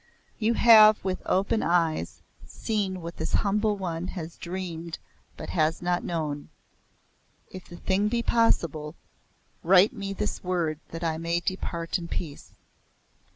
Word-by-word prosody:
"You 230 Hz, +1 st, +1 dB
have 215 Hz, -2 st, +7 dB
with 185 Hz, -1 st, -2 dB
open 195 Hz, +4 st, +1 dB
eyes 165 Hz, -2 st, 0 dB, 0.2 s
seen 200 Hz, -5 st, -3 dB
what 170 Hz, +1 st, -7 dB
this -, -, -4 dB
humble 210 Hz, 0 st, +1 dB
one 175 Hz, -2 st, -4 dB
has 165 Hz, -1 st, -6 dB
dreamed 170 Hz, -2 st, -6 dB, 0.4 s
but -, -, -7 dB
has 160 Hz, -1 st, +1 dB
not 175 Hz, 0 st, -1 dB
known. 150 Hz, -4 st, -3 dB, 1.0 s
If 185 Hz, -1 st, -9 dB
the 175 Hz, -, -11 dB
thing 195 Hz, +4 st, +1 dB
be 235 Hz, +2 st, 0 dB
possible, 160 Hz, -11 st, +1 dB, 0.7 s
write 190 Hz, +5 st, +5 dB
me 200 Hz, -4 st, -5 dB
this 210 Hz, +1 st, -3 dB
word 170 Hz, -4 st, -1 dB
that 165 Hz, +1 st, -7 dB
I 160 Hz, -1 st, -1 dB
may 170 Hz, +1 st, 0 dB
depart 175 Hz, -1 st, -3 dB
in 170 Hz, -, -7 dB
peace. 155 Hz, -4 st, -6 dB
180 Hz, 140 wpm, -26 LUFS, 165-200 Hz, 1.0 s, have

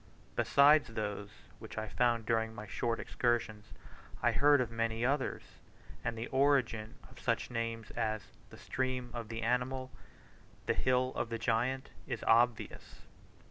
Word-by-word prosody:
Besides 145 Hz, +2 st, +5 dB
those 105 Hz, -2 st, -4 dB, 0.3 s
which -, -, -10 dB
I 110 Hz, 0 st, -2 dB
found 115 Hz, 0 st, +1 dB
during 115 Hz, -1 st, 0 dB
my 105 Hz, -, -7 dB
short 115 Hz, +2 st, -1 dB
excursions, 115 Hz, -3 st, -1 dB, 0.6 s
I -, -, +5 dB
heard 145 Hz, 0 st, +5 dB
of 120 Hz, -3 st, -1 dB
many 115 Hz, 0 st, -1 dB
others, 135 Hz, +1 st, 0 dB, 0.6 s
and 115 Hz, -1 st, -2 dB
the 115 Hz, -, -3 dB
origin 130 Hz, -6 st, +2 dB
of -, -, -15 dB
such -, -, -1 dB
names 115 Hz, -1 st, -3 dB
as 110 Hz, -2 st, -1 dB, 0.3 s
"the -, -, -12 dB
stream 130 Hz, -1 st, -2 dB
of 115 Hz, -3 st, -5 dB
the 115 Hz, 0 st, -4 dB
animal," 130 Hz, +2 st, 0 dB, 0.7 s
"the -, -, +2 dB
hill 130 Hz, 0 st, +1 dB
of -, -, -2 dB
the 115 Hz, -, -2 dB
giant," 125 Hz, +4 st, 0 dB, 0.2 s
is 120 Hz, -4 st, -4 dB
obvious. 120 Hz, 0 st, +1 dB
115 Hz, 145 wpm, -33 LUFS, 115-130 Hz, 0.7 s, Besides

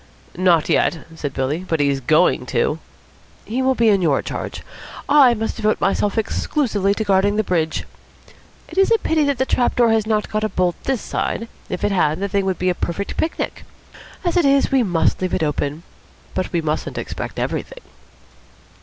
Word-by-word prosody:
"Not 175 Hz, -3 st, +3 dB
yet," 165 Hz, -, +1 dB
said 145 Hz, -3 st, -4 dB
Billy. 135 Hz, +4 st, -1 dB
"But 165 Hz, -4 st, -1 dB
he's 140 Hz, -1 st, +2 dB
going 125 Hz, -, +2 dB
to." -, -, 0 dB, 0.7 s
"He 235 Hz, +5 st, -2 dB
will 260 Hz, 0 st, +2 dB
be 230 Hz, -2 st, +3 dB
in 200 Hz, -2 st, +3 dB
your 150 Hz, -6 st, +2 dB
charge. -, -, -5 dB, 0.4 s
I 270 Hz, -5 st, +6 dB
must 220 Hz, 0 st, -3 dB
devote 215 Hz, -1 st, +1 dB
myself 205 Hz, +2 st, 0 dB
exclusively 210 Hz, -3 st, 0 dB
to 220 Hz, -, -1 dB
guarding 200 Hz, 0 st, +2 dB
the 215 Hz, -, +1 dB
bridge. 160 Hz, -5 st, -1 dB, 0.8 s
It -, -, -3 dB
is 390 Hz, -, +4 dB
a 455 Hz, -, +6 dB
pity 320 Hz, -7 st, +1 dB
that 280 Hz, -2 st, 0 dB
the 260 Hz, -, +1 dB
trap 245 Hz, -2 st, +1 dB
has 225 Hz, -3 st, +3 dB
not 215 Hz, -1 st, +1 dB
got 215 Hz, 0 st, -1 dB
a 215 Hz, -, 0 dB
bolt 180 Hz, -3 st, +1 dB
this 265 Hz, -4 st, 0 dB
side. 230 Hz, -, -3 dB, 0.2 s
If 180 Hz, -, -4 dB
it 205 Hz, -, +2 dB
had, 160 Hz, -4 st, +1 dB
the 200 Hz, -, -1 dB
thing 200 Hz, 0 st, 0 dB
would 190 Hz, -2 st, -1 dB
be 185 Hz, -, 0 dB
a -, -, +2 dB
perfect 180 Hz, +3 st, -4 dB
picnic. 320 Hz, -, -3 dB, 0.6 s
As 345 Hz, -, 0 dB
it 350 Hz, -4 st, +3 dB
is, 275 Hz, 0 st, +3 dB
we 270 Hz, -1 st, +4 dB
must 180 Hz, -6 st, +1 dB
leave 185 Hz, -1 st, 0 dB
it -, -, -1 dB
open. 150 Hz, +1 st, -2 dB, 0.5 s
But 185 Hz, -1 st, -2 dB
we 170 Hz, -, 0 dB
mustn't 155 Hz, -1 st, -3 dB
expect -, -, -5 dB
everything." -, -, -4 dB
200 Hz, 190 wpm, -20 LUFS, 170-235 Hz, 0.8 s, I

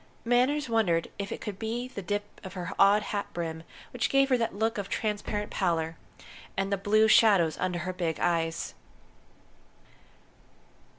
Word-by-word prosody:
Manners 255 Hz, +5 st, +2 dB
wondered 205 Hz, -8 st, +1 dB
if 200 Hz, 0 st, -4 dB
it -, -, -5 dB
could 205 Hz, -3 st, -6 dB
be 230 Hz, +3 st, -3 dB
the 230 Hz, -5 st, -7 dB
dip 205 Hz, +2 st, -2 dB, 0.2 s
of 190 Hz, -2 st, -8 dB
her 180 Hz, 0 st, -5 dB
odd 200 Hz, +2 st, +6 dB
hat 205 Hz, -1 st, -3 dB
brim 165 Hz, -2 st, -4 dB, 0.3 s
which 245 Hz, -, 0 dB
gave 275 Hz, 0 st, +3 dB
her 255 Hz, -, +4 dB
that 230 Hz, -3 st, -1 dB
look 220 Hz, +1 st, 0 dB
of 200 Hz, -, -5 dB
transparent 210 Hz, -1 st, -2 dB
pallor, 165 Hz, -4 st, 0 dB, 0.6 s
and 195 Hz, +1 st, 0 dB
the -, -, +4 dB
blue 215 Hz, +3 st, +3 dB
shadows 200 Hz, -8 st, +5 dB
under 180 Hz, -1 st, -1 dB
her 185 Hz, +2 st, -3 dB
big 170 Hz, -3 st, -2 dB
eyes. 165 Hz, -1 st, 0 dB
200 Hz, 160 wpm, -28 LUFS, 175-225 Hz, 0.6 s, odd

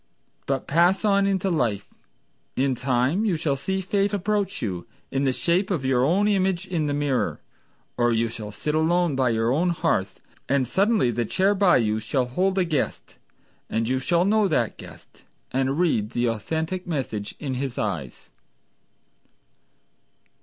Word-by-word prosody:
But 135 Hz, -1 st, -1 dB
pass 175 Hz, +7 st, +3 dB
on 200 Hz, -1 st, +3 dB
into 195 Hz, -1 st, 0 dB
life: 115 Hz, -, -1 dB, 0.6 s
In 135 Hz, 0 st, +1 dB
time 130 Hz, -, +1 dB
you 205 Hz, -6 st, +1 dB
shall 155 Hz, -3 st, 0 dB
see 190 Hz, +8 st, -2 dB
Fate 200 Hz, +2 st, 0 dB
approach 205 Hz, 0 st, -1 dB
you 90 Hz, -6 st, -4 dB, 0.2 s
In 135 Hz, +1 st, 0 dB
the 135 Hz, -, +3 dB
shape 175 Hz, +8 st, 0 dB
of 165 Hz, -9 st, -1 dB
your 130 Hz, -1 st, +2 dB
own 185 Hz, +9 st, +3 dB
image 190 Hz, -2 st, +1 dB
in 170 Hz, -5 st, -1 dB
the 145 Hz, -, -1 dB
mirror; 145 Hz, -3 st, 0 dB, 0.6 s
Or 120 Hz, 0 st, +3 dB
you 115 Hz, 0 st, +1 dB
shall 110 Hz, -2 st, -7 dB
sit 150 Hz, +8 st, -3 dB
alone 165 Hz, 0 st, +2 dB
by 130 Hz, -2 st, +2 dB
your 115 Hz, +1 st, +1 dB
own 165 Hz, +7 st, +2 dB
hearth, 125 Hz, -, -1 dB, 0.3 s
And 135 Hz, -1 st, +2 dB
suddenly 200 Hz, -, +2 dB
the 120 Hz, +1 st, -1 dB
chair 195 Hz, -, +2 dB
by 195 Hz, -2 st, +4 dB
you 110 Hz, -3 st, +1 dB
shall 125 Hz, +4 st, -1 dB
hold 185 Hz, +10 st, 0 dB
a 185 Hz, -, +3 dB
guest, 155 Hz, -4 st, -3 dB, 0.5 s
And 115 Hz, 0 st, -1 dB
you 130 Hz, +1 st, +1 dB
shall 170 Hz, +6 st, +2 dB
know 210 Hz, 0 st, +3 dB
that 120 Hz, -, 0 dB
guest -, -, -14 dB, 0.3 s
And 135 Hz, +2 st, 0 dB
read 150 Hz, -12 st, +1 dB
the 120 Hz, -, +1 dB
authentic 160 Hz, -, -3 dB
message 125 Hz, -10 st, -3 dB
of 135 Hz, -3 st, -3 dB
his 130 Hz, -1 st, -4 dB
eyes. 85 Hz, -, -4 dB
145 Hz, 165 wpm, -24 LUFS, 120-185 Hz, 0.6 s, by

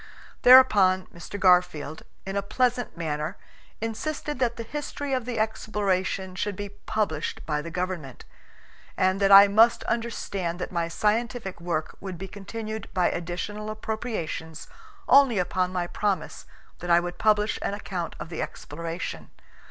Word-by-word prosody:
Thereupon 205 Hz, -8 st, +7 dB
Mr. 170 Hz, +4 st, -8 dB
Garfield, 180 Hz, -5 st, +3 dB, 0.2 s
in 195 Hz, +1 st, -4 dB
a 200 Hz, -, +1 dB
pleasant 245 Hz, +1 st, 0 dB
manner, 155 Hz, -2 st, -3 dB, 0.4 s
insisted 295 Hz, +5 st, -3 dB
that 240 Hz, -2 st, +1 dB
the 230 Hz, -, -5 dB
history 285 Hz, +2 st, -4 dB
of 255 Hz, -3 st, -1 dB
the 240 Hz, -2 st, -3 dB
exploration 200 Hz, -4 st, -1 dB
should 200 Hz, +2 st, -2 dB
be 205 Hz, +1 st, -5 dB
published 205 Hz, -5 st, -3 dB
by 150 Hz, -1 st, -1 dB
the 170 Hz, -, -7 dB
government, 175 Hz, -6 st, -4 dB, 0.7 s
and 185 Hz, +1 st, +2 dB
that 195 Hz, 0 st, +4 dB
I 200 Hz, +1 st, +11 dB
must 225 Hz, +4 st, +4 dB
understand 200 Hz, -7 st, -2 dB
that 180 Hz, -, -5 dB
my 170 Hz, -2 st, -1 dB
scientific 215 Hz, +1 st, -1 dB
work 160 Hz, -3 st, -2 dB
would 185 Hz, -2 st, -6 dB
be 190 Hz, +3 st, -6 dB
continued 215 Hz, +2 st, -7 dB
by 180 Hz, -1 st, +3 dB
additional 195 Hz, +5 st, -4 dB
appropriations 215 Hz, -7 st, -4 dB, 0.4 s
only 270 Hz, -5 st, +6 dB
upon 180 Hz, 0 st, 0 dB
my 180 Hz, -1 st, -1 dB
promise 200 Hz, +2 st, -2 dB, 0.3 s
that 175 Hz, -, -6 dB
I 170 Hz, 0 st, +6 dB
would 175 Hz, 0 st, -5 dB
publish 210 Hz, 0 st, +2 dB
an 200 Hz, -, -2 dB
account 180 Hz, -5 st, -5 dB
of -, -, -7 dB
the 165 Hz, -, -4 dB
exploration. 165 Hz, +3 st, -6 dB
195 Hz, 145 wpm, -26 LUFS, 175-220 Hz, 0.7 s, I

